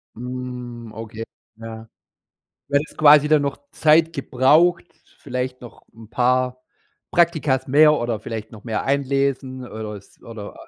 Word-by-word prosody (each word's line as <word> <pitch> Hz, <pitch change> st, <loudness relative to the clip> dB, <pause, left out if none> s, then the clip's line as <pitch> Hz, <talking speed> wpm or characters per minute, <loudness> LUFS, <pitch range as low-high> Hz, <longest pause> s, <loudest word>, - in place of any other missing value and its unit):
Mhm. 125 Hz, -1 st, -7 dB
Okay. 110 Hz, +1 st, -7 dB, 0.3 s
Ja. 115 Hz, 0 st, -9 dB, 0.8 s
Du 140 Hz, -, -6 dB
hättest 145 Hz, +2 st, -2 dB
quasi 150 Hz, -1 st, +6 dB
dann 155 Hz, -2 st, +4 dB
noch 140 Hz, 0 st, -3 dB
Zeit 160 Hz, +1 st, +4 dB
gebraucht, 155 Hz, +5 st, +3 dB, 0.3 s
vielleicht 125 Hz, -1 st, -4 dB
noch 120 Hz, -, -13 dB
'n 110 Hz, -1 st, -14 dB
paar 125 Hz, +1 st, +1 dB, 0.5 s
Praktika 155 Hz, -6 st, +2 dB
mehr 150 Hz, +3 st, +6 dB
oder 120 Hz, -5 st, -2 dB
vielleicht 110 Hz, 0 st, -7 dB
noch 105 Hz, -2 st, -13 dB
mehr 110 Hz, -3 st, -2 dB
einlesen 135 Hz, -1 st, -1 dB
oder 110 Hz, -2 st, -7 dB
es 100 Hz, -, -15 dB
oder, 110 Hz, -3 st, -9 dB
125 Hz, 135 wpm, -21 LUFS, 115-145 Hz, 0.8 s, quasi